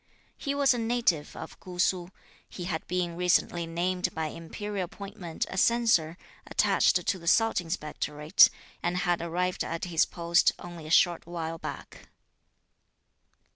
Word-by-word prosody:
He 280 0 -3
was 280 -2 +4
a 245 - -2
native 225 -10 0
of 160 - -9
Kú 180 -1 -10
Su. 180 -1 +1 0.4
He 180 - -7
had 175 -3 -4
been 175 -1 -1
recently 175 -1 +1
named 180 +2 -1
by 160 -1 -2
Imperial 195 +5 -5
appointment 195 -2 -6
a 190 - -3
Censor 215 -9 +3 0.3
attached - - +2
to 190 - 0
the 170 - -11
Salt 225 +2 +3
Inspectorate, 150 0 +2 0.3
and 175 +1 -1
had 175 -2 +1
arrived 180 +2 -1
at 165 +1 -4
his 170 -2 +2
post 170 0 +2
only 170 -3 -9
a - - -8
short 170 +1 +3
while 165 -1 -4
back. - - -8
175 Hz, 145 wpm, -28 LUFS, 165-185 Hz, 0.4 s, was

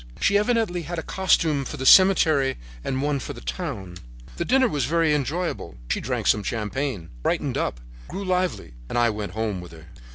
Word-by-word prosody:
She 200 - +2
evidently 210 -4 +1
had 170 +1 -5
a 165 - -3
costume 165 -6 +2
for 150 - -6
the 130 - -4
cemetery 155 -7 +6 0.3
and 130 +1 -2
one 145 -1 0
for 145 - -6
the 120 - -10
town. 110 - -5 0.4
"The - - -1
dinner 260 +1 +4
was 145 - -1
very 165 +1 +2
enjoyable. 150 - -2
She - - 0
drank - - -2
some 105 - +3
champagne, 110 - -3
brightened - - -1
up, - - -2 0.3
grew 200 - -5
lively 185 - -1 0.2
and - - -2
I 120 -1 +4
went 105 -1 -5
home 110 -4 -2
with 90 -1 -11
her. 80 -1 -14
145 Hz, 190 wpm, -24 LUFS, 110-180 Hz, 0.4 s, cemetery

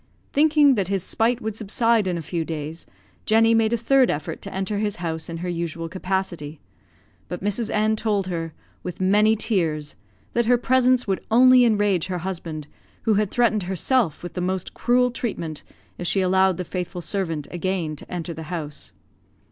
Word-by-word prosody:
Thinking 295 -1 +5
that 200 -7 0
his 195 -2 -1
spite 230 +4 0
would 220 -1 -3
subside 225 0 +2
in 180 -2 -1
a 165 - -5
few 165 +2 -2
days, 160 0 -6 0.4
Jenny 225 +1 +5
made 225 -1 +3
a 235 - +2
third 255 +3 +3
effort 155 +2 -3
to - - -7
enter 195 +2 -2
his 210 -1 -1
house 160 -2 -4
in 165 - -5
her - - -2
usual 170 -1 -3
capacity; 180 -4 -3 0.7
but 180 - -6
Mrs. 210 +2 0
N 215 +1 +2
told 210 -3 0
her, 165 -3 -3 0.3
with 180 -1 -6
many 210 +4 +4
tears, 165 -9 -1 0.4
that 235 -1 +1
her 245 0 +5
presence 255 0 +3
would 195 -2 -2
only 255 +2 +7
enrage 205 -6 +2
her 185 -1 -2
husband, 165 -5 -5 0.4
who 220 - +3
had 210 -1 +1
threatened 230 -2 +2
herself 190 - +1
with 175 - -6
the 180 - -3
most 185 0 -2
cruel 250 0 +2
treatment 170 -11 -4 0.4
if 175 - -3
she 195 - +2
allowed 190 -1 +3
the 180 - -4
faithful 180 0 -4
servant 165 -6 -2
again 175 -3 -2
to - - -12
enter 170 -1 -4
the 160 - -8
house. 155 -5 -6
190 Hz, 180 wpm, -23 LUFS, 170-225 Hz, 0.7 s, only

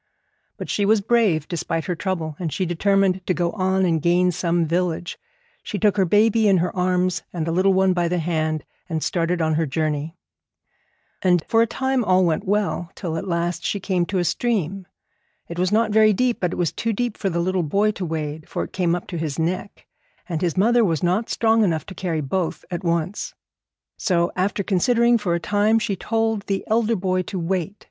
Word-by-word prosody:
But - - -6
she 205 - 0
was 215 +2 +4
brave, 200 -8 +2
despite 165 -2 -3
her 180 - -1
trouble, 165 -3 -3
and 170 -4 -3
she 185 - -1
determined 190 +2 +1
to 185 - +1
go 175 -1 0
on 190 -2 +1
and 165 -3 +1
gain 180 +2 +3
some 170 -1 0
village. 170 +1 -2 0.4
She 205 - -5
took 205 -1 +2
her 190 - +3
baby 215 +4 +3
in 195 -2 +5
her 180 +2 -1
arms 180 0 +1
and 165 -3 -3
the 165 - -1
little 190 +3 +3
one 190 0 +3
by 175 -1 0
the 180 +1 0
hand, 155 -2 -1 0.3
and 160 -2 -2
started 170 -1 0
on 160 0 +1
her 160 0 0
journey. 155 +2 -2 1.0
And 180 -3 +3
for 225 - +3
a 230 - +3
time 265 +2 0
all 185 -2 +3
went 170 +5 -1
well, 200 -4 0
till 170 -5 -4
at 165 - -4
last 170 0 -1
she 200 - -1
came 180 -3 0
to 195 - -2
a 180 - +2
stream. 195 -1 -1 0.6
It 170 +1 -6
was 185 +1 +1
not 220 +1 +2
very 215 0 +5
deep, 245 +3 0
but 180 -1 -1
it - - -5
was 175 -3 0
too 225 -1 -2
deep 240 +1 -2
for 195 - -2
the 170 - -2
little 185 +1 0
boy 200 +7 +1
to 200 - -6
wade, 155 -2 -4
for - - -2
it - - -9
came 175 -2 +1
up 175 - -5
to 175 -4 -4
his 155 -3 -3
neck, 175 +4 -3 0.4
and 170 -4 -3
his 175 -2 -1
mother 235 +5 +4
was 165 -6 0
not 185 +6 +1
strong 225 -1 +3
enough 160 -6 0
to - - -9
carry 170 -4 -2
both 165 +5 -2
at 175 +1 -4
once. 170 +3 -2 0.6
So, 175 -4 +1
after 195 +2 0
considering 235 +5 +3
for 180 -5 0
a - - -1
time, 210 +4 +2
she 210 -3 -1
told 225 +1 -1
the 195 -1 -1
elder 225 +1 +1
boy 185 -1 0
to 185 - -6
wait. 180 +2 -2
185 Hz, 215 wpm, -22 LUFS, 170-205 Hz, 1.0 s, in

